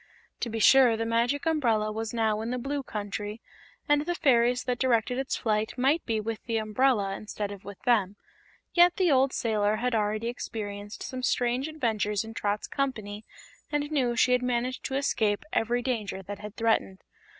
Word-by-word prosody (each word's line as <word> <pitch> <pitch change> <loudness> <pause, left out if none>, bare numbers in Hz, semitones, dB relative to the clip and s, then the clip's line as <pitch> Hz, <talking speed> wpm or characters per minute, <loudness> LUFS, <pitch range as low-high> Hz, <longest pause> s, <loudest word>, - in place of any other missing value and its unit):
To 240 - -2
be 225 - -4
sure, 245 +1 +6
the 225 - -1
Magic 235 +5 0
Umbrella 230 -10 +1
was 220 +1 -4
now 220 -2 0
in 225 - -3
the 250 - -1
Blue 280 +3 -2
Country, 210 -2 -5 0.5
and 290 0 +4
the 350 - 0
fairies 245 -4 +3
that 250 -1 -2
directed 245 0 +1
its 270 - -2
flight 215 0 -1
might 275 +6 +2
be 225 -2 0
with 220 +1 -4
the 230 -1 -1
umbrella 215 -2 +1
instead 210 -1 -5
of 200 -1 -9
with 200 -1 -9
them, 205 -5 +2 0.6
yet 350 0 +6
the 370 -5 +2
old 265 0 +4
sailor 215 -3 +1
had 250 +3 -1
already 215 +1 0
experienced 205 -3 -6
some 255 -1 -5
strange 250 +2 0
adventures 220 -9 -1
in 225 0 -9
Trot's 205 -1 -2
company 220 -6 -3 0.5
and 295 0 -1
knew 250 -5 +1
she 250 - +3
had 250 0 +3
managed 250 +1 -1
to 265 - -2
escape 220 -4 0
every 240 +2 +1
danger 215 -6 -3
that 205 +2 -7
had 210 +1 -8
threatened. 225 -4 0
230 Hz, 185 wpm, -28 LUFS, 210-255 Hz, 0.6 s, sure